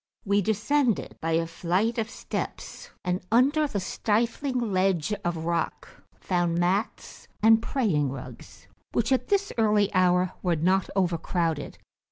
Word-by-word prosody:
We 200 0 +2
descended 225 +5 0
by 165 0 -1
a 165 +1 +2
flight 185 +8 -1
of 225 0 -2
steps, 250 - -6 0.2
and 180 0 -1
under 285 +6 +4
the 210 -7 -3
stifling 235 +7 -1
ledge 185 -1 +1
of 165 -2 -2
rock 170 -1 -2 0.3
found 175 -2 0
mats 185 +5 -2 0.2
and 225 0 +6
praying 190 - 0
rugs, 130 -5 -10 0.3
which, 235 +2 0
at 260 - +1
this 400 0 0
early 210 -2 +3
hour, 180 -1 +3
were 175 -2 +1
not 185 +4 +1
overcrowded. 170 -4 -1
190 Hz, 135 wpm, -26 LUFS, 170-225 Hz, 0.3 s, and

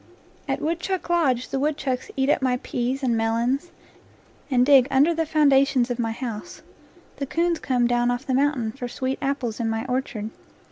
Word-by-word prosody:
At - - -2
Woodchuck 340 +2 -2
Lodge 265 -8 +1
the 270 - -2
woodchucks 280 -3 -1
eat 265 0 +2
up 290 - +2
my 255 -1 +1
peas 255 +3 -2
and 240 -3 +2
melons 235 +8 0 0.8
and 250 -2 +3
dig 270 -2 +6
under 275 +5 +4
the 325 -1 -1
foundations 275 -4 +3
of 245 - -3
my 225 -1 0
house; 230 -3 -6 0.5
the 275 - -3
coons 335 +3 0
come 250 -2 +1
down 240 0 +2
off 245 +3 -2
the 260 - -1
mountain 265 -4 +1
for 250 0 -6
sweet 260 +2 -3
apples 270 -5 -2
in 230 -1 0
my 225 +2 -2
orchard. 250 -4 -3
260 Hz, 180 wpm, -24 LUFS, 240-285 Hz, 0.8 s, dig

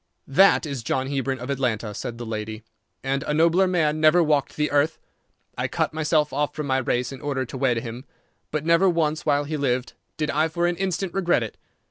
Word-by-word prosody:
"That 190 +6 +5
is 140 -5 -4
John 130 +3 -1
Hebron, 135 -1 -1
of 125 +2 -5
Atlanta," 115 -5 -1
said 115 +3 -5
the 120 - -6
lady, 110 0 -5 0.4
"and 135 +1 0
a 150 +1 -2
nobler 170 +4 +4
man 155 -4 +1
never 155 +3 +6
walked 150 -3 +1
the 150 0 0
earth. 145 +2 +2 0.6
I - - -1
cut - - -1
myself 155 -2 +1
off 145 +1 -1
from 150 - -3
my 130 -1 +1
race 125 0 -1
in 135 - -9
order 140 -3 -2
to 120 - -9
wed 125 -3 +2
him, 120 +3 -7 0.4
but 155 0 -3
never 170 +3 +4
once 160 -2 0
while 145 -1 +3
he 150 +1 -3
lived 130 -3 -1 0.2
did 150 -1 -1
I 155 +3 +2
for 170 +2 -1
an 175 0 0
instant 190 -1 -2
regret 175 -10 +2
it. 110 - -7
145 Hz, 210 wpm, -24 LUFS, 130-160 Hz, 0.6 s, never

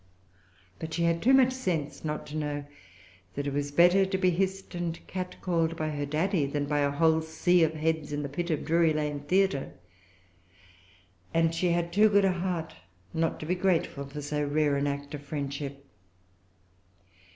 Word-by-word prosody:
But 160 0 -5
she 170 - 0
had 170 0 +1
too 255 - +4
much 260 -1 +5
sense 175 - -3
not 150 -1 -3
to 150 - -8
know 145 -2 -3 0.7
that 145 - -3
it 140 - -2
was 145 0 -1
better 175 +5 +5
to 190 0 -1
be 185 -1 +3
hissed 190 +2 -2
and 175 -1 -3
catcalled 180 -3 -2
by 155 -1 -2
her 145 -1 -3
Daddy, 155 +1 +1
than 145 +1 -2
by 145 0 0
a 145 0 +2
whole 160 +2 +3
sea 170 +3 +2
of 160 0 +1
heads 155 -1 -1
in 145 0 -2
the - - -2
pit 170 +5 -4
of 155 -3 -1
Drury 165 0 +3
Lane 150 -1 -2
Theatre; 180 0 +1 1.6
and 165 0 +3
she 175 +2 +1
had 170 0 0
too 215 +3 +6
good 200 -1 +4
a 190 - +3
heart 175 - -3 0.4
not 165 0 0
to - - -5
be 175 - 0
grateful 175 -6 0
for 145 +1 -7
so 150 +1 -1
rare 145 0 +1
an 140 +1 0
act 140 0 -4
of 145 - -5
friendship. 140 -1 -5
160 Hz, 185 wpm, -28 LUFS, 145-175 Hz, 1.6 s, too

